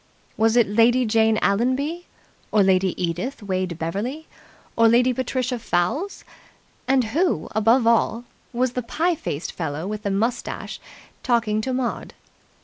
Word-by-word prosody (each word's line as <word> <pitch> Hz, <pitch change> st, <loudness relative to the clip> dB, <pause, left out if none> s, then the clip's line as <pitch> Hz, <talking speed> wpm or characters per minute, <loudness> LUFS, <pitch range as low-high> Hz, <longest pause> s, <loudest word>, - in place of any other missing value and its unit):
Was 225 Hz, +1 st, +2 dB
it 240 Hz, -, +6 dB
Lady 235 Hz, +4 st, +3 dB
Jane 220 Hz, 0 st, +3 dB
Allenby 260 Hz, -, 0 dB, 0.4 s
or 210 Hz, -2 st, +4 dB
Lady 190 Hz, -1 st, +2 dB
Edith 180 Hz, +8 st, -3 dB
Wade 185 Hz, -3 st, -2 dB
Beverly 210 Hz, -, -4 dB, 0.5 s
or 230 Hz, 0 st, +5 dB
Lady 245 Hz, +2 st, +4 dB
Patricia 255 Hz, 0 st, -2 dB
Fowles? 230 Hz, -, -1 dB, 0.6 s
And 265 Hz, -1 st, +3 dB
who, 345 Hz, +4 st, 0 dB
above 225 Hz, +3 st, +3 dB
all, 230 Hz, 0 st, +2 dB, 0.3 s
was 255 Hz, 0 st, 0 dB
the 250 Hz, -, -3 dB
pie 330 Hz, +9 st, 0 dB
faced 160 Hz, -, -4 dB
fellow 160 Hz, -1 st, -4 dB
with 210 Hz, +1 st, -4 dB
the 205 Hz, -, -2 dB
moustache 220 Hz, +5 st, -2 dB, 0.4 s
talking 230 Hz, -4 st, +1 dB
to 260 Hz, -, -3 dB
Maud? 255 Hz, -2 st, -3 dB
230 Hz, 140 wpm, -23 LUFS, 200-255 Hz, 0.6 s, it